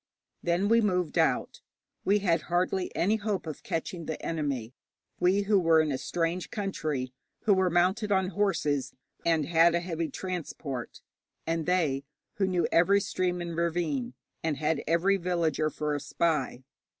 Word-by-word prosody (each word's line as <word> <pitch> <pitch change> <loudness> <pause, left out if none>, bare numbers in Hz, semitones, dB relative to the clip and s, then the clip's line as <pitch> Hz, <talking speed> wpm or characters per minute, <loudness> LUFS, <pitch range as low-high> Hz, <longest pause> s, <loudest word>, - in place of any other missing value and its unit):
Then 175 +3 +1
we 230 +2 +5
moved 180 -6 0
out. - - +1 0.4
We 200 +2 +3
had 165 -3 +3
hardly 180 +1 +1
any 205 +6 +2
hope 210 -4 -2
of 155 -2 -6
catching 165 0 -4
the 160 - -3
enemy, 140 -8 -2 0.5
we 185 +3 +3
who 200 0 +3
were 165 -2 +4
in 155 -1 +2
a 135 - -1
strange 170 +1 -2
country, 155 - -3 0.3
who 210 - +4
were 190 -1 +3
mounted 185 +5 +2
on 190 -2 +2
horses, 150 -10 0 0.3
and 160 -3 +2
had 165 +2 +4
a - - +3
heavy 165 -2 -3
transport, 155 -8 -5 0.4
and 165 0 -1
they 155 -7 +1 0.3
who 195 -2 +2
knew 180 -2 +1
every 195 +4 +5
stream 180 -2 -1
and 170 -1 -4
ravine, 160 -7 -1 0.3
and 160 -3 0
had 155 +2 0
every 175 +5 +3
villager 170 -4 0
for 150 0 -2
a 145 - -1
spy. 145 -6 -1
170 Hz, 160 wpm, -29 LUFS, 155-185 Hz, 0.5 s, we